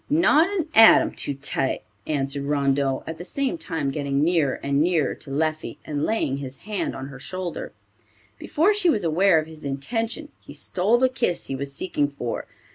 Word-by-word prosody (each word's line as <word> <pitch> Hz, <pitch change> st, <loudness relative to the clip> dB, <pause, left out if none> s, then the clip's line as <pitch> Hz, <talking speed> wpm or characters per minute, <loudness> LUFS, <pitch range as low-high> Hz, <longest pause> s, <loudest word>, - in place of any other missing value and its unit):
"Not 315 Hz, +1 st, +4 dB
an 370 Hz, -6 st, -2 dB
atom 225 Hz, -2 st, +7 dB
too 145 Hz, -, -4 dB
tight," 135 Hz, -1 st, -1 dB, 0.2 s
answered 140 Hz, -1 st, -1 dB
Rondeau, 140 Hz, -2 st, +1 dB
at 160 Hz, 0 st, -6 dB
the -, -, -5 dB
same 275 Hz, -, -2 dB
time 150 Hz, -, -2 dB
getting 140 Hz, 0 st, -1 dB
nearer 160 Hz, -5 st, +1 dB
and 140 Hz, +1 st, +1 dB
nearer 165 Hz, -2 st, +2 dB
to -, -, -8 dB
Leffie, 155 Hz, +2 st, -2 dB
and 145 Hz, -1 st, -2 dB
laying 175 Hz, -11 st, 0 dB
his 135 Hz, -1 st, -7 dB
hand 210 Hz, -2 st, -2 dB
on 135 Hz, +1 st, -6 dB
her 135 Hz, -2 st, -10 dB
shoulder. 185 Hz, +3 st, -5 dB, 0.7 s
Before 340 Hz, +8 st, +2 dB
she 405 Hz, -4 st, +2 dB
was 220 Hz, -, +2 dB
aware 170 Hz, +2 st, +4 dB
of 155 Hz, -, +1 dB
his 160 Hz, -1 st, -11 dB
intention, 225 Hz, -, -3 dB
he -, -, -13 dB
stole 200 Hz, +6 st, +1 dB
the 260 Hz, +1 st, +4 dB
kiss 250 Hz, -9 st, -1 dB
he 135 Hz, -, -4 dB
was 140 Hz, +1 st, -4 dB
seeking 145 Hz, -3 st, 0 dB
for. 140 Hz, -5 st, -5 dB
155 Hz, 185 wpm, -24 LUFS, 140-220 Hz, 0.7 s, atom